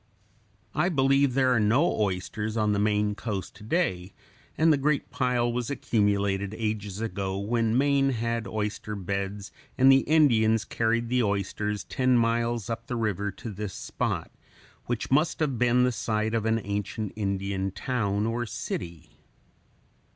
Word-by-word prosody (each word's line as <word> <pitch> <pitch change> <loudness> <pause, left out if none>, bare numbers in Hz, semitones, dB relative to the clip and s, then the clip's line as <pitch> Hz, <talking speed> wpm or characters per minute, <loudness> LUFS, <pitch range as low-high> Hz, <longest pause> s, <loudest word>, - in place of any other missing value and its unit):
I 175 - +2
believe 135 -3 +3
there 130 -2 +4
are 120 - +3
no 120 +12 +3
oysters 105 +3 -2
on 105 -1 +2
the 100 - +1
Maine 105 0 +1
coast 100 -3 -4
to 105 - -13
day, 105 - -1 0.4
and 160 0 +5
the - - +2
great 140 +1 0
pile 125 -2 +1
was 120 -1 -2
accumulated 100 -5 0
ages 105 -3 -3
ago 95 -3 -3
when 115 +3 0
Maine 140 0 +3
had 115 -2 -2
oyster 105 0 -3
beds 100 +1 -4 0.3
and 135 +1 +7
the 135 - +7
Indians 115 -8 +4
carried 115 +1 0
the 125 0 +2
oysters 105 0 -1
ten 130 -1 +2
miles 115 -1 +1
up 115 0 -5
the 125 - -3
river 105 -3 -1
to 115 - -7
this 100 -1 -5
spot - - -3 0.6
which 120 0 -3
must 150 +5 +2
have 140 -7 0
been 125 0 +4
the 125 - +3
site 110 -1 -1
of 110 -1 0
an 110 0 +2
ancient 100 +1 -3
Indian 100 -2 -2
town 100 0 -1
or 115 +1 -2
city. 85 -4 -6
110 Hz, 155 wpm, -27 LUFS, 100-125 Hz, 0.6 s, and